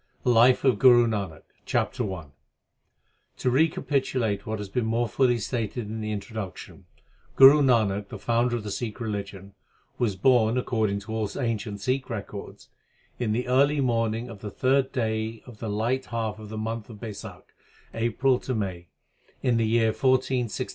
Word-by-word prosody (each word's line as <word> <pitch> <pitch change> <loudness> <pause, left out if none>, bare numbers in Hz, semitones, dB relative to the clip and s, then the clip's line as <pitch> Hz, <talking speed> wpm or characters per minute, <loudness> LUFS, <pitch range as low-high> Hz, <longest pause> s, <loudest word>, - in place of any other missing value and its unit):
I - - +3
LIFE 120 +2 +5
OF 130 -3 +3
GURU 120 -2 +7
NANAK 100 -7 -3 0.2
CHAPTER 100 - -1
I 90 -4 -6 1.1
To 125 - 0
recapitulate 130 -7 0
what 110 0 -2
has 105 -1 -6
been 125 +5 -1
more 115 +1 +1
fully 120 +2 +2
stated 115 0 -3
in 110 0 -4
the 110 0 -3
Introduction, 105 -2 -7 0.5
Guru 135 +3 +9
Nanak. 105 -6 +2
the - - -8
founder 120 +1 +1
of 115 - -4
the 105 - -5
Sjkh 110 +4 -4
religion, 100 -3 -5 0.5
was 110 -6 +1
born, 115 +2 +3
according 110 -5 0
to 110 +2 -7
all 110 -2 -1
ancient 110 -5 -3
Sikh 130 +4 -1
rprords. 105 -3 -7 0.5
in 120 -3 0
the 125 +3 -1
early 140 +3 +3
morningjpf 115 -3 -1
the 105 - -6
third 135 +4 +1
day 110 -2 -2
oL 125 - -10
th 110 0 -6
light 120 +5 -1
half 110 -2 -3
of 105 -1 -10
thp 110 - -6
month 110 +1 -4
of 110 - -10
Raisakh 105 -2 -8 0.5
(April 120 +3 +1 0.2
May) 95 -5 -4 0.6
in 125 -3 +2
the__ySr_ 120 +2 +2
AiD. - - -3
115 Hz, 160 wpm, -26 LUFS, 105-125 Hz, 1.1 s, Guru